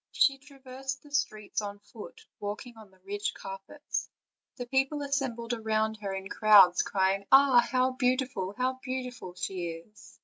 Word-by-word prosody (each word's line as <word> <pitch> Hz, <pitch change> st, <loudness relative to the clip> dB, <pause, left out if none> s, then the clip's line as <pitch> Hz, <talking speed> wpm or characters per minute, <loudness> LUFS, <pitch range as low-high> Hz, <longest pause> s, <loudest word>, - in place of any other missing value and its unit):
She 275 Hz, -2 st, +3 dB
traversed 270 Hz, -1 st, -8 dB
the 295 Hz, -, -17 dB
streets 215 Hz, -7 st, -1 dB
on 205 Hz, -1 st, -6 dB
foot, 205 Hz, +1 st, -12 dB
walking 210 Hz, +4 st, -6 dB
on 220 Hz, -2 st, -14 dB
the 190 Hz, -, -25 dB
rich 205 Hz, +1 st, -3 dB
carpets; 195 Hz, +9 st, -6 dB, 0.5 s
the 245 Hz, -, -5 dB
people 270 Hz, +3 st, 0 dB
assembled 255 Hz, -4 st, -2 dB
round 220 Hz, 0 st, 0 dB
her 200 Hz, -2 st, -4 dB
in 190 Hz, 0 st, -5 dB
crowds, 200 Hz, -4 st, +6 dB
crying: 195 Hz, 0 st, 0 dB
"Ah! 270 Hz, -2 st, +7 dB
how 255 Hz, +2 st, +2 dB
beautiful, 255 Hz, -6 st, -1 dB
how 260 Hz, +1 st, -1 dB
beautiful 250 Hz, -8 st, -5 dB
she 185 Hz, -1 st, -3 dB
is!" 170 Hz, +6 st, -11 dB
225 Hz, 150 wpm, -29 LUFS, 200-260 Hz, 0.5 s, Ah